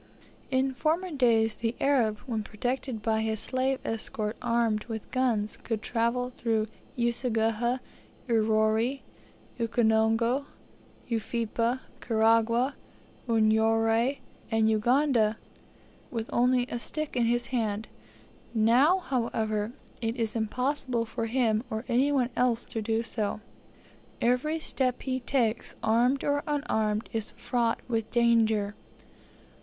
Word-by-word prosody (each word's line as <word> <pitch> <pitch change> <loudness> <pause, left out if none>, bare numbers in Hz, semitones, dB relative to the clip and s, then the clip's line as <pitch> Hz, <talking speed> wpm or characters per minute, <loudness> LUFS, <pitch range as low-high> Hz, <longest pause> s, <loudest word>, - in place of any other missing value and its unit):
In 265 0 +1
former 330 +7 0
days 225 -6 +2
the 230 0 -2
Arab, 245 -7 +2
when 230 -4 -2
protected 245 +2 -3
by 220 0 +1
his 220 -1 -1
slave 260 0 0
escort, 220 -1 -2
armed 230 -3 +1
with 220 -2 -6
guns, 230 -5 0
could 225 -2 -4
travel 245 +1 0
through 225 -3 0 0.3
Useguhha, 235 0 +1 0.5
Urori, 220 +3 +2 0.6
Ukonongo, 230 +3 +2 0.6
Ufipa, 230 +2 -1 0.2
Karagwah, 230 +3 +2 0.6
Unyoro, 225 +3 +3 0.3
and 220 -1 +3
Uganda, 230 -1 +2 0.7
with 225 -1 -4
only 250 0 +3
a 240 - -2
stick 305 +4 -3
in 240 -2 +2
his 240 +1 +1
hand; 220 -3 -1 0.7
now, 245 +11 +5
however, 225 - -1 0.3
it 225 0 -1
is 230 -3 -2
impossible 250 +2 0
for 225 0 -3
him 225 -2 +1
or 220 +2 -4
any 260 +3 +2
one 255 -3 +1
else 245 -2 +1
to 225 - -4
do 225 +1 0
so. 215 -2 -2 0.8
Every 250 +7 +1
step 255 -5 -1
he 260 -1 -1
takes, 240 -3 -1
armed 240 +5 +3
or 285 0 +1
unarmed, 220 -7 0
is 220 -2 -2
fraught 235 -2 0
with 225 -3 -1
danger. 225 -3 +3
230 Hz, 115 wpm, -28 LUFS, 220-255 Hz, 0.8 s, now